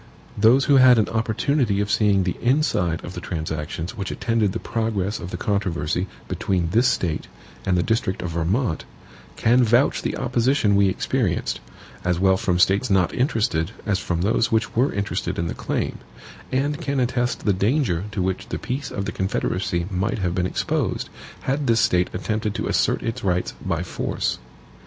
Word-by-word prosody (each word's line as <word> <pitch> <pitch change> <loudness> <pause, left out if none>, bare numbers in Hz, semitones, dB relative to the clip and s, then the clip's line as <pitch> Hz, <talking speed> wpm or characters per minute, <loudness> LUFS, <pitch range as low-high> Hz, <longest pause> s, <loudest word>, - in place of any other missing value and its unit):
Those 115 +6 +5
who 140 -2 +5
had 130 -2 +7
an 110 - +2
opportunity 115 0 +1
of 100 0 -1
seeing 100 -3 +3
the 90 -1 -1
inside 120 - +1
of 90 - -7
the - - -6
transactions 80 +3 -4
which 100 -3 -4
attended 115 -4 0
the 110 - -2
progress 110 -3 -2
of 85 - -6
the - - -5
controversy 90 -3 -1 0.2
between 90 -3 -1
this 120 +6 +4
State 80 -4 -1 0.4
and 90 -1 +3
the 90 - +2
district 105 -5 -1
of 90 - -3
Vermont, 85 +4 0 0.5
can 125 +2 +4
vouch 120 +5 +3
the - - -2
opposition 120 -3 +2
we 100 -1 +4
experienced, - - -1 0.4
as 90 -1 0
well 95 0 +4
from 90 -1 0
States 100 +7 +3
not 95 -3 +2
interested 110 - 0
as 100 -3 +1
from 85 -3 -2
those 110 +2 +2
which 115 +2 0
were 130 +5 +3
interested 100 0 -2
in 85 - -1
the 85 - -2
claim; - - -3 0.5
and 145 +4 0
can 140 -3 -1
attest 125 0 -1
the 105 - +4
danger 100 - +1
to 95 -4 -1
which 95 0 -2
the - - -2
peace 135 +2 -4
of 100 - -4
the 100 - -2
Confederacy 90 -2 -1
might 95 +1 -1
have 90 -4 -1
been 90 0 0
exposed, - - -1 0.3
had 140 +1 -1
this 115 -1 +4
State 90 -3 +2
attempted 105 +3 -2
to 105 - -2
assert - - +1
its 115 +1 -3
rights 90 -2 0
by - - -1
force. - - -2
100 Hz, 180 wpm, -23 LUFS, 90-120 Hz, 0.5 s, had